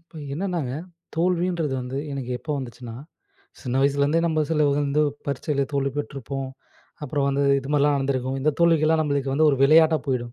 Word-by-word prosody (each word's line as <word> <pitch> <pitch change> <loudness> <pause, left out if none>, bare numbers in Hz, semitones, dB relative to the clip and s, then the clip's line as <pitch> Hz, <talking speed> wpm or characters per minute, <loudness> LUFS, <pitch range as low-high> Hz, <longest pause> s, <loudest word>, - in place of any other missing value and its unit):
இப்ப 165 -1 -13
என்னன்னாங்க, 170 -6 -2 0.4
"தோல்வி"ன்றது 170 -3 0
வந்து 125 +2 -4
எனக்கு 135 -3 -5
எப்போ 150 - -4
வந்துச்சுனா, 120 -2 -8 0.7
சின்ன 130 +1 -1
வயசுலேருந்தே 140 +3 +2
நம்ம 155 -2 +1
சிலவங்க 145 -2 +2
வந்து 145 +2 +2 0.2
பரீட்சையில 140 0 -1
தோல்வி 140 -1 0
பெற்றிருப்போம். 135 -1 -5 0.6
அப்புறம் 140 0 -1
வந்து, 140 +1 +1 0.2
இது 135 - -9
மாதிரிலாம் 145 0 +3
நடந்துருக்கும். 135 -1 -1
இந்த 150 +3 +2
தோல்விக்கெல்லாம் 160 -1 +4
நம்மளுக்கு 140 -2 -1
வந்து 155 +2 +4
ஒரு 140 - +1
விளையாட்டா 160 +2 +6
போயிடும். 120 -3 -2
140 Hz, 155 wpm, -24 LUFS, 135-155 Hz, 0.7 s, விளையாட்டா